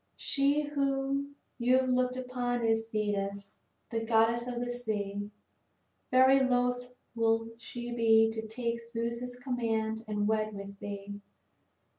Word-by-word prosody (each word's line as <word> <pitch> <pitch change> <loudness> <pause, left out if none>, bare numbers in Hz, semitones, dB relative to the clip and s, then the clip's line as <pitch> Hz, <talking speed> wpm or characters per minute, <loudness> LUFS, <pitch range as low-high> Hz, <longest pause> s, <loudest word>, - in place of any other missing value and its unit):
She 285 +2 +2
whom 275 -1 -1 0.2
you 250 +2 +4
have 260 0 +1
looked 250 0 +2
upon 245 -2 -1
is 225 0 +2
Thetis, 200 -2 -2 0.3
the 230 - 0
goddess 230 +1 +3
of 245 -1 -3
the 245 - -2
sea. 210 -4 -3 0.8
Very 260 +1 +6
loath 250 -1 +1 0.2
will 225 -1 +1
she 240 +1 -6
be 225 -1 +5
to 220 0 -5
take 235 +1 -2
Zeus's 235 +1 -3
command 225 -3 -1
and 205 -1 0
wed 215 -1 0
with 200 0 -8
thee. 205 0 -6
235 Hz, 130 wpm, -31 LUFS, 220-250 Hz, 0.8 s, Very